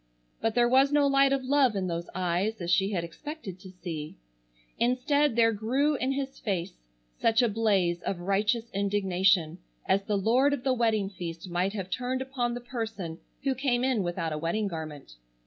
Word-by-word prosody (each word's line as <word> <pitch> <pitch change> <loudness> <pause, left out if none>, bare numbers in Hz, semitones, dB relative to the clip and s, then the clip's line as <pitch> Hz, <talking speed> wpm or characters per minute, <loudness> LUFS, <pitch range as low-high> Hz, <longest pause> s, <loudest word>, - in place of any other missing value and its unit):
But 225 0 0
there 240 -1 +4
was 265 +3 +4
no 290 -1 +4
light 275 0 +4
of 275 -1 +1
love 265 -3 +3
in 190 -1 -1
those 170 -1 -3
eyes 185 +4 0
as 175 -1 -2
she 190 +2 +3
had 185 -5 -1
expected 195 - -8
to 190 0 -11
see. 170 -4 -6 0.6
Instead 255 +3 +2
there 230 -1 +5
grew 255 +8 +1
in 265 -1 0
his 270 0 -4
face 190 -4 -2 0.5
such 230 +2 +3
a - - +4
blaze 200 -6 +1
of 180 -3 -3
righteous 210 +5 +1
indignation 190 -4 +2 0.3
as 195 +1 +2
the 205 +1 -1
lord 250 +8 +3
of 265 -3 -3
the 260 -1 +2
wedding 220 -5 +1
feast 175 -1 -7
might 180 +3 0
have 190 -3 -5
turned 255 +1 -1
upon 245 -3 -2
the 245 - -5
person 220 -9 -5 0.2
who 270 -1 +1
came 255 -2 0
in 255 -5 +2
without 175 -3 -2
a 150 - -3
wedding 185 +7 -1
garment. 155 - -7
215 Hz, 185 wpm, -28 LUFS, 180-255 Hz, 0.6 s, there